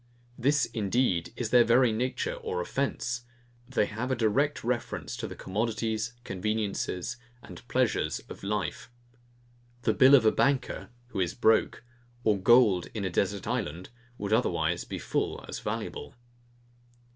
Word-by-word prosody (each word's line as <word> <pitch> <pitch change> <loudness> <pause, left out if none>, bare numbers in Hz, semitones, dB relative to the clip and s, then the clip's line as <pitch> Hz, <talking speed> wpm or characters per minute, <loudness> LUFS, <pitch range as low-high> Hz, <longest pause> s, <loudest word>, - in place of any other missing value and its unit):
This 140 +2 +2
indeed 110 -5 0
is 120 -3 -3
their 125 -1 +7
very 120 +1 +4
nature 125 +4 -1
or 90 - -4
offence: 120 +3 -2 0.5
they 130 -5 +2
have 115 +5 -4
a 130 - +1
direct 125 +6 +1
reference 120 +1 -2
to - - -4
the - - -8
commodities, 110 +2 -2
conveniences, 105 +1 -2 0.3
and - - -11
pleasures - - +1
of - - -10
life. 105 +7 -3 0.9
The 110 - +3
bill 130 +6 +7
of 125 -5 +4
a 110 - +6
banker, 140 -1 0 0.2
who 105 - -4
is 90 -2 0
broke, 110 -2 +2 0.4
or 105 -2 +2
gold 105 -3 +5
in 105 -3 -2
a 95 - -2
desert 100 +2 0
island, 100 -8 -3 0.3
would 100 +1 -2
otherwise - - +1
be - - -5
full - - -2
as - - -5
valuable. - - -5
110 Hz, 145 wpm, -29 LUFS, 100-125 Hz, 0.9 s, their